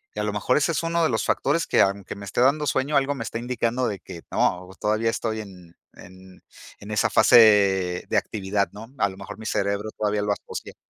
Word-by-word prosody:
Y - - -4
a - - -1
lo 105 - -1
mejor 105 +5 0
ese 150 +3 +2
es 160 - -2
uno 165 0 0
de 160 - +3
los 110 - -1
factores 165 +4 0
que, - - +3
aunque 100 0 -1
me 100 - -10
esté 100 - -4
dando 145 +4 +3
sueño, 140 +2 0
algo 140 +1 +2
me 120 -4 -5
está 115 - -4
indicando 120 0 -1
de 100 -3 -5
que, 85 - -10
no, 90 +1 0
todavía 110 +2 +1
estoy 110 -1 -2
en 90 -4 -14 0.2
en 95 +1 -15 0.4
en 105 +1 -10
esa 105 - +1
fase 100 -6 +5
de - - 0
actividad, 100 -1 -1
¿no? 105 +3 -10
A 100 -1 +2
lo 95 - -11
mejor 100 +2 -9
mi 110 - -10
cerebro 100 0 -1
todavía 105 -1 0
lo 105 0 -1
asocie. - - -6
105 Hz, 225 wpm, -24 LUFS, 100-125 Hz, 0.4 s, fase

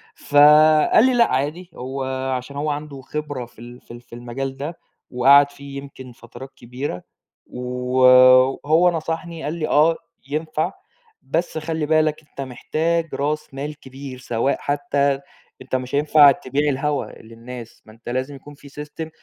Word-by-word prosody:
فقال 150 - +5
لي: 260 - +3
"لأ 235 -1 +3
عادي." 150 +7 -2
هو 130 +2 -5 0.3
عشان 130 +3 -9
هو 145 +2 -2
عنده 145 -2 -5
خبرة 145 -2 -5
في 120 - -21
ال 120 +1 -12
في - - -16
ال 120 0 -10
في 120 - -14
المجال 130 +3 -5
ده، 150 +5 -6 0.3
وقعد 140 +3 +5
فيه 140 -1 -10
يمكن 135 -2 -10
فترات 120 +3 -12
كبيرة. 125 -5 -7 0.3
و - - -10 1.0
وهو 160 +4 +4
نصحني 165 0 -5
قال 150 - -3
لي: 165 -2 -3
"آه 160 +3 +3 0.3
ينفع. 155 +3 -2 0.5
بس 165 0 -2
خلِّ 160 0 -3
بالك 155 0 +1
أنت - - -8
محتاج 160 +6 -2
راس 150 +1 -3
مال 145 +2 -6
كبير 135 -1 -10
سواء 125 +1 -1
حتّى 145 -1 0 0.4
أنت 130 0 -4
مش 130 +1 -3
هينفع 145 0 +6
تبيع 140 +3 -1
الهوا 145 +1 -1 0.2
للناس، 115 +1 -11
ما 110 - -15
أنت 115 +2 -11
لازم 130 +3 -3
يكون 145 +2 -13
في 140 0 -15 0.2
system 160 +2 -8
140 Hz, 155 wpm, -21 LUFS, 130-155 Hz, 1.0 s, هينفع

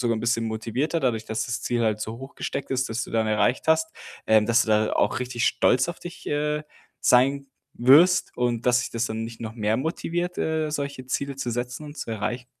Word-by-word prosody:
sogar 115 -2 +1
'n - - -4
bisschen 115 -1 +1
motivierter 115 +9 -2
dadurch, 115 -5 0
dass 110 0 -2
das 125 0 -3
Ziel 120 -2 -1
halt 110 -1 +1
so 110 +1 -4
hochgesteckt 135 +1 -6
ist, 130 0 0
das 115 +1 -2
du - - -12
dann 110 -1 +1
erreicht 110 +7 +1
hast, 160 0 +3 0.4
ähm, 110 -1 +4
dass 115 +1 +4
du - - -6
da 110 0 +2
auch - - +1
richtig 125 -1 -2
stolz 130 +1 +3
auf 175 - -5
dich, 175 - -10
äh, 150 +1 -1 0.4
sein 135 +3 +3 0.3
wirst 150 +9 +5
und 120 -2 0
dass 125 0 +4
dich - - -4
das 115 0 -1
dann 110 -1 -3
nicht 115 0 -8
noch 110 0 -6
mehr 110 -1 0
motiviert, 175 +5 -2
äh, 160 -1 0
solche 140 -3 -4
Ziele 140 +1 -2
zu 125 -3 -3
setzen 125 +5 -4
und 150 +1 -10
zu - - -5
erreichen? 120 +3 -4
125 Hz, 220 wpm, -25 LUFS, 115-140 Hz, 0.4 s, wirst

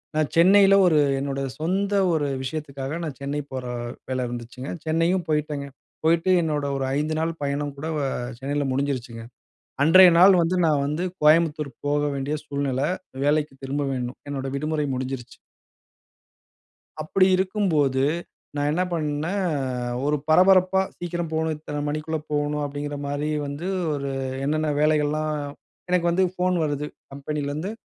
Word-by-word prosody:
நான் 155 -2 +1
சென்னையில 195 +3 +6
ஒரு 155 -3 +4 0.2
என்னோட 140 0 -3 0.2
சொந்த 195 +5 0 0.2
ஒரு 145 -2 +1 0.2
விஷயத்துக்காக, 140 +1 -4
நான் 140 -4 -6
சென்னை 145 +1 -2
போற 130 -1 -4 0.5
வேல 130 -1 -1
இருந்துச்சுங்க. 120 +2 -7 0.2
சென்னையும் 165 +3 +1
போயிட்டேங்க. 150 -2 -1 0.4
போயிட்டு 170 +3 +3
என்னோட 150 -2 -1
ஒரு 135 - -1
5 155 +2 -1
நாள் 165 +1 0
பயணம் 140 0 -2
கூட 155 +3 -5
வ 145 - -1 0.4
சென்னைல 140 +1 -1
முடிஞ்சிருச்சுங்க. 125 -4 -3 0.6
அன்றைய 180 +4 +8
நாள் 190 +2 +8
வந்து 170 +3 +1
நான் 150 -3 +2
வந்து 150 +5 -2 0.2
கோயம்புத்தூர் 150 -1 +4 0.2
போக 145 0 +1
வேண்டிய 140 +3 -2
சூழ்நில, 140 -2 -2 0.4
வேலைக்கு 150 0 +1
திரும்ப 140 +2 -2
வேணும், 125 0 -4
என்னோட 135 -1 -3
விடுமுறை 150 0 -1
முடிஞ்சிருச்சு. 130 -1 -5 1.7
அப்பிடி 185 +5 +3
இருக்கும்போது, 175 -9 +1 0.5
நா - - -1
என்ன 180 +4 +1
பண்ணே 155 +1 -1 0.7
ஒரு 150 +1 +2
பரபரப்பா, 185 +3 +5 0.2
"சீக்கிரம் 175 -1 -4
போணோ, 160 0 0
இத்தன 150 -1 -5
மணிக்குள்ள 155 +1 -2
போநோ" 145 0 0
அப்டிங்கிற 145 +1 -5
மாரி 145 +1 -2 0.2
வந்து, 145 +5 -5 0.3
ஒரு 140 -1 -3 0.3
என்னன்ன 155 +1 0
வேலைகள்லா 150 0 +2 0.7
எனக்கு 175 -1 +2
வந்து 185 +2 +3
ஃபோன் 180 0 +1
வருது, 145 -1 -2 0.3
கம்பெனிலேந்து, 150 +5 -3
150 Hz, 135 wpm, -24 LUFS, 140-165 Hz, 1.7 s, அன்றைய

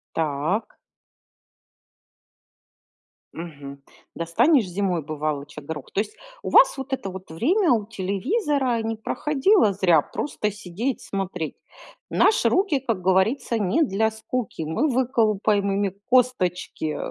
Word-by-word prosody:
Так. 160 +8 -1 2.6
Мгм. 140 -4 -9 0.3
Достанешь 200 - +3
зимой, 180 -2 -1
бывалоча 150 0 -4
горох. 150 -1 -7
То 200 - +1
есть 210 - -5 0.3
у - - -4
вас - - +6
вот 270 0 -7
это 195 -7 -2
вот 185 -2 -10
время 330 - +2
у 215 -3 +1
телевизора 240 - -1
не 225 0 -2
проходило 285 - +2
зря, 175 -6 +4
просто 210 -7 -3
сидеть 210 +6 -4
смотреть. 185 -5 -4 0.5
Наши 430 - +3
руки, 370 -8 +2
как 230 -7 -2
говорится, 220 +6 +2
не 205 - +2
для 220 -4 +1
скуки. 220 -3 -4
Мы 160 - 0
выколупаем 215 -5 +1
ими 195 -1 0
косточки, 185 -10 +1
205 Hz, 115 wpm, -24 LUFS, 175-250 Hz, 2.6 s, вас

